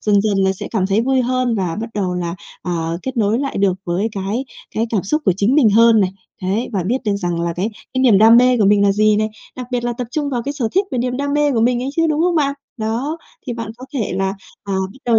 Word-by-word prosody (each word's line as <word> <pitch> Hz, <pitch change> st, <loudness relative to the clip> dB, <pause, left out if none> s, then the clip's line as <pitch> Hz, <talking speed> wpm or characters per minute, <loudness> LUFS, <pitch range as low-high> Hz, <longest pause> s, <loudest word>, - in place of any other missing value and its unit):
dần 205 Hz, -1 st, +3 dB
dần 205 Hz, -2 st, +1 dB
là 190 Hz, 0 st, +3 dB
sẽ 190 Hz, -, -7 dB
cảm 195 Hz, -5 st, 0 dB
thấy 200 Hz, +3 st, +2 dB
vui 260 Hz, +2 st, +2 dB
hơn, 255 Hz, -1 st, 0 dB
và 185 Hz, -6 st, -2 dB
bắt 230 Hz, +1 st, -5 dB
đầu 190 Hz, -3 st, -1 dB
là, 170 Hz, -1 st, -3 dB, 0.3 s
à, 165 Hz, -2 st, -2 dB
kết 265 Hz, 0 st, -5 dB
nối 220 Hz, 0 st, +2 dB
lại 275 Hz, 0 st, -3 dB
được 195 Hz, -1 st, +3 dB
với 180 Hz, +5 st, 0 dB
cái 200 Hz, +6 st, -2 dB, 0.3 s
cái 225 Hz, +2 st, 0 dB
cảm 210 Hz, -5 st, 0 dB
xúc 305 Hz, +11 st, -1 dB
của 190 Hz, -, +4 dB
chính 205 Hz, +6 st, +2 dB
mình 270 Hz, -8 st, +5 dB
hơn 225 Hz, +1 st, +6 dB
này. 190 Hz, -2 st, +2 dB, 0.3 s
Đấy, 200 Hz, +6 st, -1 dB
và 195 Hz, -3 st, 0 dB
biết 245 Hz, -, +1 dB
được 205 Hz, -2 st, +1 dB
rằng 175 Hz, -3 st, -2 dB
là 170 Hz, 0 st, -1 dB
cái 195 Hz, +5 st, -1 dB, 0.2 s
cái 260 Hz, -, +1 dB
niềm 230 Hz, -7 st, +6 dB
đam 225 Hz, +2 st, +7 dB
mê 250 Hz, +1 st, +5 dB
của 210 Hz, -, +3 dB
mình 205 Hz, 0 st, +4 dB
là 200 Hz, -1 st, +4 dB
gì 215 Hz, +1 st, +3 dB
này, 215 Hz, +1 st, +1 dB, 0.3 s
đặc 250 Hz, -1 st, -6 dB
biệt 245 Hz, -1 st, -1 dB
là 240 Hz, -, 0 dB
tập 245 Hz, +1 st, -5 dB
trung 290 Hz, +1 st, -2 dB
vào 245 Hz, -3 st, -1 dB
cái 285 Hz, -, -2 dB
sở 265 Hz, -6 st, -2 dB
thích 390 Hz, +3 st, +2 dB
về 255 Hz, -, -2 dB
niềm 250 Hz, +1 st, -1 dB
đam 285 Hz, +1 st, -2 dB
mê 295 Hz, -1 st, +2 dB
của 230 Hz, -, +1 dB
mình 240 Hz, +1 st, +2 dB
ấy 260 Hz, -, -2 dB
chứ, 330 Hz, 0 st, +3 dB
đúng 305 Hz, 0 st, 0 dB
không 350 Hz, +1 st, +2 dB
bạn? 280 Hz, -3 st, +1 dB, 0.2 s
Đó, 240 Hz, +8 st, -2 dB, 0.3 s
thì 245 Hz, -, -2 dB
bạn 230 Hz, -2 st, -5 dB
có 255 Hz, -, -10 dB
thể 225 Hz, -9 st, -1 dB
là, 195 Hz, 0 st, 0 dB, 0.3 s
à, 200 Hz, -, -4 dB, 0.2 s
bắt 265 Hz, -, -17 dB
đầu 235 Hz, -2 st, +4 dB
225 Hz, 285 wpm, -19 LUFS, 200-255 Hz, 0.3 s, đam